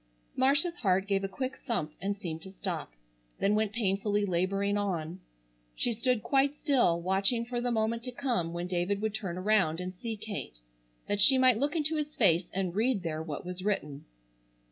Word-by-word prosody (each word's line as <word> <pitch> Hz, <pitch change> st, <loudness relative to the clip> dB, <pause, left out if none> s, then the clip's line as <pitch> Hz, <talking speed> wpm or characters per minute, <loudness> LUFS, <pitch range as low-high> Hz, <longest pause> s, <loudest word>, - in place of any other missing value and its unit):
Marcia's 290 Hz, +7 st, +3 dB
heart 190 Hz, -3 st, +2 dB
gave 195 Hz, -1 st, +1 dB
a -, -, 0 dB
quick 255 Hz, +7 st, -4 dB
thump 155 Hz, -10 st, -1 dB
and 200 Hz, +1 st, -1 dB
seemed 165 Hz, -5 st, -5 dB
to 190 Hz, -, -9 dB
stop, 190 Hz, -, -4 dB, 0.5 s
then 200 Hz, -, +2 dB
went 215 Hz, -1 st, +1 dB
painfully 205 Hz, -1 st, 0 dB
laboring 195 Hz, +2 st, 0 dB
on. 180 Hz, -4 st, -2 dB, 0.6 s
She 240 Hz, -, 0 dB
stood 235 Hz, 0 st, 0 dB
quite 280 Hz, +1 st, +2 dB
still 245 Hz, -, +3 dB
watching 195 Hz, +6 st, +1 dB
for 240 Hz, 0 st, -3 dB
the 245 Hz, -, 0 dB
moment 230 Hz, 0 st, 0 dB
to 250 Hz, -, -4 dB
come 240 Hz, -10 st, -1 dB
when 175 Hz, +1 st, -3 dB
David 180 Hz, +2 st, -1 dB
would 220 Hz, -1 st, 0 dB
turn 185 Hz, -5 st, -4 dB
around 185 Hz, -4 st, +2 dB
and 180 Hz, 0 st, -4 dB
see 220 Hz, +4 st, -5 dB
Kate 205 Hz, -, -6 dB, 0.5 s
that 205 Hz, 0 st, +1 dB
she 260 Hz, +7 st, +7 dB
might 255 Hz, -3 st, +5 dB
look 290 Hz, +5 st, 0 dB
into 315 Hz, 0 st, +1 dB
his 300 Hz, 0 st, -3 dB
face 175 Hz, -5 st, +3 dB
and 185 Hz, -2 st, -2 dB
read 220 Hz, -2 st, +1 dB
there 160 Hz, -2 st, -3 dB
what 155 Hz, -1 st, -6 dB
was 180 Hz, +1 st, -4 dB
written. 150 Hz, -9 st, -2 dB
200 Hz, 190 wpm, -30 LUFS, 180-240 Hz, 0.6 s, she